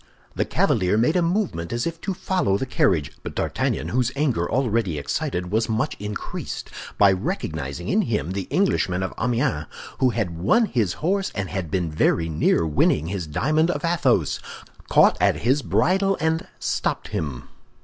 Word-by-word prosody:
The -, -, 0 dB
cavalier 95 Hz, +3 st, +2 dB
made 125 Hz, +9 st, +2 dB
a 180 Hz, -, +3 dB
movement 170 Hz, -, -1 dB
as 120 Hz, 0 st, -1 dB
if 165 Hz, 0 st, -4 dB
to 195 Hz, -, -3 dB
follow 180 Hz, -, 0 dB
the 130 Hz, -, -2 dB
carriage; 80 Hz, -, +1 dB
but -, -, -7 dB
D'Artagnan, -, -, -1 dB
whose 125 Hz, 0 st, +1 dB
anger, 130 Hz, -, 0 dB
already 115 Hz, -, 0 dB
excited, 90 Hz, +5 st, -2 dB
was 110 Hz, +2 st, +1 dB
much 115 Hz, +7 st, 0 dB
increased 105 Hz, 0 st, -5 dB, 0.3 s
by 100 Hz, -1 st, +6 dB
recognizing 75 Hz, -6 st, -3 dB
in -, -, +3 dB
him 80 Hz, +6 st, -1 dB
the 95 Hz, -1 st, -3 dB
Englishman 95 Hz, -, +1 dB
of 95 Hz, -, -3 dB
Amiens 120 Hz, -, 0 dB, 0.3 s
who 130 Hz, -, +4 dB
had 95 Hz, -9 st, -2 dB
won 225 Hz, -, +4 dB
his 110 Hz, -, 0 dB
horse 195 Hz, +2 st, +1 dB
and 100 Hz, -3 st, -3 dB
had 95 Hz, -5 st, -3 dB
been 85 Hz, -2 st, -1 dB
very 80 Hz, +1 st, +1 dB
near 80 Hz, +1 st, +2 dB
winning 75 Hz, +1 st, +2 dB
his 90 Hz, -4 st, -3 dB
diamond 155 Hz, -, +1 dB
of 175 Hz, -, -1 dB
Athos, 135 Hz, -, +2 dB, 0.5 s
caught -, -, +5 dB
at -, -, +4 dB
his 130 Hz, +5 st, +2 dB
bridle 195 Hz, +6 st, +2 dB
and 160 Hz, +1 st, 0 dB
stopped -, -, -2 dB
him. 70 Hz, -6 st, -4 dB
110 Hz, 170 wpm, -23 LUFS, -, 0.5 s, by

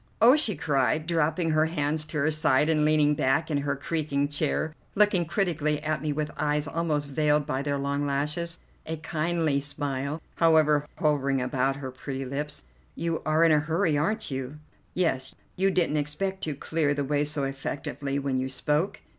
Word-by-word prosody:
"Oh!" 245 Hz, +5 st, +7 dB
she 235 Hz, -10 st, +1 dB
cried, 145 Hz, 0 st, +1 dB
dropping 165 Hz, 0 st, +1 dB
her 155 Hz, +1 st, +3 dB
hands 155 Hz, -1 st, -1 dB
to 155 Hz, -, -5 dB
her 155 Hz, +2 st, +2 dB
side 155 Hz, -1 st, +3 dB
and 155 Hz, -2 st, +3 dB
leaning 150 Hz, -1 st, +4 dB
back 150 Hz, +4 st, +1 dB
in 145 Hz, -, +1 dB
her 140 Hz, 0 st, -1 dB
creaking 145 Hz, -1 st, -1 dB
chair, 150 Hz, +1 st, -1 dB, 0.2 s
looking 200 Hz, -4 st, +4 dB
critically 160 Hz, -4 st, 0 dB
at 155 Hz, -2 st, -1 dB
me 150 Hz, -1 st, -1 dB
with 150 Hz, +1 st, -2 dB
eyes 150 Hz, 0 st, 0 dB
almost 155 Hz, -3 st, -1 dB
veiled 150 Hz, +1 st, +2 dB
by 135 Hz, -2 st, -2 dB
their 140 Hz, 0 st, -1 dB
long 140 Hz, +1 st, -1 dB
lashes, 150 Hz, +4 st, -1 dB, 0.3 s
a 160 Hz, 0 st, -3 dB
kindly 160 Hz, -2 st, 0 dB
smile, 140 Hz, 0 st, -3 dB, 0.2 s
however, 155 Hz, -3 st, +4 dB
hovering 140 Hz, -3 st, +1 dB
about 130 Hz, +1 st, 0 dB
her 135 Hz, -2 st, -6 dB
pretty 135 Hz, +1 st, -5 dB
lips. 145 Hz, +3 st, -4 dB, 0.3 s
"You 165 Hz, -1 st, -2 dB
are 155 Hz, +1 st, +4 dB
in 165 Hz, -, +5 dB
a 155 Hz, -, +5 dB
hurry, 160 Hz, +2 st, +1 dB
aren't 195 Hz, +6 st, -1 dB
you?" 135 Hz, +2 st, -4 dB, 0.4 s
"Yes, 135 Hz, -7 st, 0 dB, 0.2 s
you 190 Hz, +1 st, +2 dB
didn't 175 Hz, -5 st, +1 dB
expect 190 Hz, +7 st, -2 dB
to 155 Hz, -2 st, -3 dB
clear 145 Hz, 0 st, 0 dB
the 145 Hz, -1 st, -1 dB
way 145 Hz, +1 st, +1 dB
so 150 Hz, -1 st, -1 dB
effectively 135 Hz, +1 st, -3 dB
when 135 Hz, -2 st, -1 dB
you 130 Hz, +1 st, -2 dB
spoke?" 150 Hz, +7 st, 0 dB
150 Hz, 180 wpm, -27 LUFS, 140-160 Hz, 0.4 s, Oh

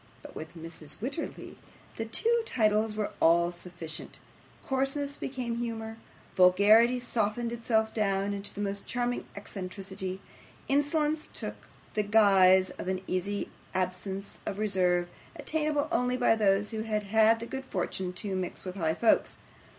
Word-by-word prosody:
But -, -, -11 dB
with 160 Hz, +2 st, -8 dB
Mrs. 165 Hz, -2 st, -9 dB
Wititterly 280 Hz, +9 st, -5 dB, 0.4 s
the 225 Hz, -, -3 dB
two 465 Hz, -, +2 dB
titles 215 Hz, -, +1 dB
were 215 Hz, -1 st, -2 dB
all 170 Hz, +1 st, +4 dB
sufficient; 175 Hz, -2 st, -8 dB, 0.5 s
coarseness 275 Hz, +2 st, -1 dB
became 250 Hz, -5 st, -4 dB
humour, 225 Hz, -2 st, -4 dB, 0.4 s
vulgarity 210 Hz, +7 st, +6 dB
softened 235 Hz, -1 st, -1 dB
itself 225 Hz, -2 st, 0 dB
down 200 Hz, -2 st, 0 dB
into 200 Hz, 0 st, -4 dB
the 205 Hz, -, -6 dB
most 200 Hz, 0 st, -3 dB
charming 245 Hz, 0 st, -1 dB
eccentricity; 190 Hz, -1 st, -5 dB, 0.5 s
insolence 300 Hz, +2 st, +1 dB
took -, -, -7 dB, 0.3 s
the 215 Hz, -, +2 dB
guise 195 Hz, -3 st, +5 dB
of -, -, -5 dB
an 185 Hz, 0 st, -1 dB
easy 200 Hz, +3 st, -2 dB, 0.2 s
absence 190 Hz, +2 st, -3 dB
of 195 Hz, -, -4 dB
reserve, 180 Hz, -4 st, +2 dB, 0.3 s
attainable 305 Hz, -1 st, -1 dB
only 250 Hz, -6 st, +1 dB
by 245 Hz, -2 st, +4 dB
those 205 Hz, -1 st, +2 dB
who 220 Hz, -1 st, -3 dB
had 215 Hz, -1 st, -1 dB
had 220 Hz, +2 st, +4 dB
the 230 Hz, -, -5 dB
good 265 Hz, +2 st, -5 dB
fortune 185 Hz, -3 st, -2 dB
to 190 Hz, +2 st, -4 dB
mix 185 Hz, 0 st, -4 dB
with 185 Hz, +1 st, -5 dB
high 160 Hz, -3 st, +1 dB
folks. 230 Hz, -, +2 dB
210 Hz, 145 wpm, -29 LUFS, 185-240 Hz, 0.5 s, vulgarity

